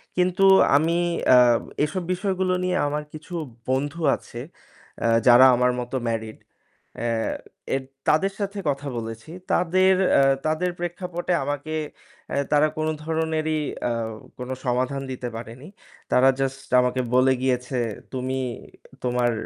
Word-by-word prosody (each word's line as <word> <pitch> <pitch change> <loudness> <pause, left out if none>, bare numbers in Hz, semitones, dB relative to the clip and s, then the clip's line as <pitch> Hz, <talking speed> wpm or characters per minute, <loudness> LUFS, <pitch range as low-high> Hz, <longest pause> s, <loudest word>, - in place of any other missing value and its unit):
কিন্তু 180 +2 +2 0.3
আমি 165 +3 +1 0.3
অ্যা 125 - +8 0.5
এসব 175 +4 -4
বিষয়গুলো 185 -1 -1
নিয়ে 185 0 0
আমার 150 +1 -2
কিছু 155 +3 -10 0.4
বন্ধু 145 +5 -1
আছে 120 - -9 0.6
অ্যা 115 - +2 0.2
যারা 125 +2 +9
আমার 125 +1 +2
মতো 125 +2 -5
married। 110 -1 -4 0.6
অ্যা 115 -1 -1 0.4
এদ 135 - -4 0.2
তাদের 175 +6 +3
সাথে 200 0 -3
কথা 140 +1 -4
বলেছি। 115 +3 -7 0.2
তাদের 185 +2 +3 0.2
অ্যা 135 - +5 0.2
তাদের 160 +4 0
প্রেক্ষাপটে 175 0 -3
আমাকে 145 +3 -3 0.6
অ্যা - - -1
তারা 150 +1 +5
কোনো 155 0 0
ধরনেরই 160 -1 -1 0.3
আও 115 -1 -2 0.3
কোনো 125 +1 -5
সমাধান 130 +3 0
দিতে 125 -1 -5
পারেনি। 115 +6 -9 0.4
তারা 130 +1 +5
just 135 0 -3
আমাকে 125 +1 0
বলে 130 +1 +5
গিয়েছে, 125 0 -1 0.3
"তুমি 130 0 -2 0.7
তোমার 120 -1 +1
140 Hz, 130 wpm, -24 LUFS, 125-170 Hz, 0.7 s, যারা